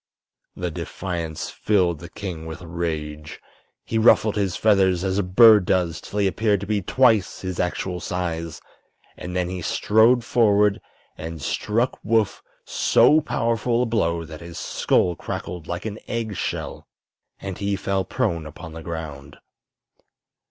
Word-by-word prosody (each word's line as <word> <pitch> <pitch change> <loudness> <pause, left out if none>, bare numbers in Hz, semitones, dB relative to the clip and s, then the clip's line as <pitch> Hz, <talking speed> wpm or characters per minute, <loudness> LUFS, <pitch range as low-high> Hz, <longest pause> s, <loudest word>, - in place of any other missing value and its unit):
The 90 -2 -3
defiance 85 -1 -5
filled 90 -6 +1
the 85 - -10
king 90 -5 -6
with 80 +2 -8
rage. 80 -3 -4 0.5
He 110 - -1
ruffled 110 -1 +5
his 100 -4 0
feathers 95 -4 +3
as 95 0 0
a - - +4
bird 105 +1 +6
does, 90 -3 0
till 105 - -7
he 100 - +2
appeared 105 +1 +1
to - - -4
be 105 0 0
twice 110 -4 +2
his 95 -2 -4
actual 90 0 -2
size, 85 -3 -4 0.5
and 90 +1 -7
then 90 -1 0
he 90 0 -5
strode 110 +7 +3
forward 105 -4 +3 0.4
and 80 0 -6
struck 110 - -1
Woof 110 -1 +1 0.2
so 155 +1 +4
powerful 115 0 0
a - - 0
blow 85 -8 0
that 80 0 -10
his 85 -1 -9
skull 90 -1 +1
crackled 85 0 -6
like 85 +3 -4
an 110 0 -5
egg 115 -3 -3
shell - - -4 0.5
and 95 -2 -6
he 100 -1 0
fell 95 0 -1
prone 90 -10 -2
upon 80 +2 -10
the 80 - -8
ground. 80 -4 -7
95 Hz, 150 wpm, -23 LUFS, 85-105 Hz, 0.5 s, bird